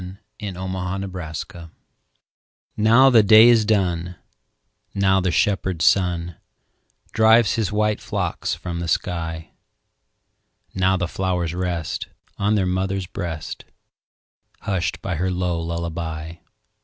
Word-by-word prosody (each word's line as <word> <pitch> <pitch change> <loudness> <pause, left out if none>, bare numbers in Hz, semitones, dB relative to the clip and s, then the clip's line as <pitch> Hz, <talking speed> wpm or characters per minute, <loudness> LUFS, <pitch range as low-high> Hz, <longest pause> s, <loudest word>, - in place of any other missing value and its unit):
Louisa 95 -2 -5
May 95 0 -4
Alcott 95 +1 -4
Lullaby 85 0 -7 1.1
NOW 115 +5 +5
the 115 -3 +7
day 110 +2 +8
is 115 -2 +5
done, 90 -5 0 0.8
Now 95 -1 +3
the 90 - 0
shepherd 95 -2 0
sun 90 -3 +1 0.7
Drives 110 -2 +4
his 110 -3 -1
white 105 0 0
flocks - - -2
from 85 -1 -6
the 85 - -4
sky; 80 -1 -3 1.2
Now 95 0 +2
the 90 -1 -1
flowers 90 -2 -2
rest 90 -3 -3 0.3
On 105 +2 +2
their 100 -3 +1
mother's 95 +1 -1
breast, 85 -4 -6 1.0
Hushed 95 -5 -2
by 85 - -3
her 95 +3 -1
low 90 -2 -1
lullaby. 85 -1 -5
90 Hz, 120 wpm, -22 LUFS, 85-100 Hz, 1.2 s, day